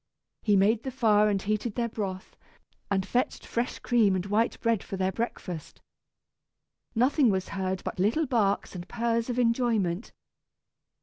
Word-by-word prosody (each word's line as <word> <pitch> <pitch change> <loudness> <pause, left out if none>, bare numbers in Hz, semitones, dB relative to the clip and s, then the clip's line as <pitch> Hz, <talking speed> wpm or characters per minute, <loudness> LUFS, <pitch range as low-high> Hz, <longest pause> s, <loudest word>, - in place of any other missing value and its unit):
He 210 -2 +3
made 210 +3 +3
the 265 - -4
fire 215 -5 +3
and 200 -1 +1
heated 215 +2 -2
their 235 -1 0
broth, 195 -5 -5 0.5
and 190 -2 +1
fetched 245 +5 -1
fresh 235 +2 -2
cream 225 -6 +3
and 185 0 -2
white 210 +3 +1
bread 230 -4 +1
for 195 - -6
their 190 0 +1
breakfast. 185 -7 -5 1.2
Nothing 255 +2 +4
was 190 -2 -1
heard 190 -1 -2
but - - -5
little 225 - +2
barks 215 -7 +1
and 180 -1 -8
purrs 230 0 0
of 245 - -2
enjoyment. 230 -6 +1
215 Hz, 150 wpm, -28 LUFS, 190-235 Hz, 1.2 s, Nothing